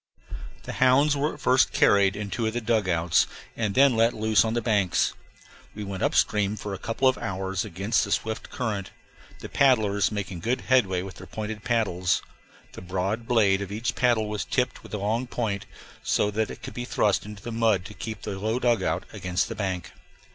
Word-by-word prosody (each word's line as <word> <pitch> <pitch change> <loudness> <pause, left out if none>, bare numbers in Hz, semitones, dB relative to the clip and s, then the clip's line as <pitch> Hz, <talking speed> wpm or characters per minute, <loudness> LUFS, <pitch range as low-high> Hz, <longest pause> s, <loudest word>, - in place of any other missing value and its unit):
The - - -6
hounds 140 +3 +5
were 145 +2 -1
at - - -15
first 130 +1 +3
carried 100 -1 +4
in 100 -1 -5
two 115 -2 -1
of 110 - -2
the 120 - -1
dugouts, 95 -8 +2 0.3
and 110 -4 -1
then 135 -2 +5
let 115 +1 +3
loose 110 0 +3
on 110 0 -1
the - - +2
banks. 100 -7 +2 0.6
We 105 - -5
went 95 -2 -5
up - - +1
stream 105 0 +2
for 105 -1 -6
a 95 - -5
couple 115 +5 0
of 130 - +2
hours 95 0 -2
against 100 +3 0
the 100 - -4
swift 110 +2 -2
current, 105 -6 -3 0.5
the - - -6
paddlers 110 -8 +3
making 100 -4 -4
good 120 +9 -1
headway 95 -9 +2
with 95 -1 -9
their - - -11
pointed 110 -1 -5
paddles 95 -7 +1 0.5
the - - -10
broad 95 +5 -2
blade 100 -5 +3
of 100 -1 -5
each 110 +4 -2
paddle 120 -4 +2
was 105 -1 -3
tipped 125 -1 -1
with - - -7
a - - -1
long 110 +5 -1
point, 105 -5 -3 0.3
so 105 - +1
that 110 +1 -1
it - - -9
could - - -7
be 120 - -4
thrust 105 -4 +1
into 105 -1 -10
the 120 - -5
mud 110 -5 +2
to 105 - -9
keep 110 +2 -7
the 95 - -4
low 110 +4 0
dugout 120 -2 +1
against 90 +1 -1
the 115 - -5
bank. 95 -4 -3
105 Hz, 205 wpm, -26 LUFS, 100-115 Hz, 0.6 s, hounds